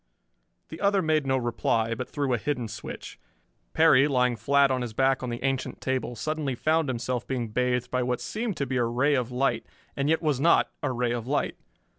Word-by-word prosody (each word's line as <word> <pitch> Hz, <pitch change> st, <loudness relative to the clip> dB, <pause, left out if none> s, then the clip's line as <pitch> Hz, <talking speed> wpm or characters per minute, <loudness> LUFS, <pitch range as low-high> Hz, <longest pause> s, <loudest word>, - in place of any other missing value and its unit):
The 160 Hz, -, -9 dB
other 200 Hz, -1 st, +3 dB
made 155 Hz, -3 st, +1 dB
no 130 Hz, 0 st, +2 dB
reply, 115 Hz, -2 st, 0 dB
but 125 Hz, +2 st, -5 dB
threw 140 Hz, -3 st, -1 dB
a 120 Hz, -, +1 dB
hidden 125 Hz, -2 st, -2 dB
switch. 110 Hz, 0 st, -8 dB, 0.5 s
Perry, 135 Hz, +2 st, +5 dB
lying 125 Hz, -3 st, +2 dB
flat 140 Hz, +5 st, +3 dB
on 130 Hz, -1 st, 0 dB
his 120 Hz, -3 st, -4 dB
back 135 Hz, +2 st, +2 dB
on 125 Hz, -, -3 dB
the 120 Hz, +1 st, -5 dB
ancient 135 Hz, -1 st, -2 dB
table, 130 Hz, -2 st, -2 dB
suddenly 150 Hz, +1 st, -2 dB
found 155 Hz, +3 st, +1 dB
himself 125 Hz, 0 st, -2 dB
being 125 Hz, -4 st, -2 dB
bathed 125 Hz, +1 st, 0 dB
by 125 Hz, -, +1 dB
what 125 Hz, 0 st, -1 dB
seemed 220 Hz, -3 st, -3 dB
to 140 Hz, -, -1 dB
be 130 Hz, 0 st, -2 dB
a 120 Hz, -, +2 dB
ray 125 Hz, +5 st, +1 dB
of 125 Hz, -3 st, 0 dB
light, 130 Hz, +2 st, 0 dB, 0.3 s
and 140 Hz, +1 st, 0 dB
yet 160 Hz, +1 st, +2 dB
was 150 Hz, -4 st, +1 dB
not 170 Hz, +4 st, +4 dB
a -, -, -1 dB
ray 125 Hz, -1 st, 0 dB
of 120 Hz, -1 st, -3 dB
light. 145 Hz, +2 st, 0 dB
130 Hz, 210 wpm, -27 LUFS, 120-145 Hz, 0.5 s, Perry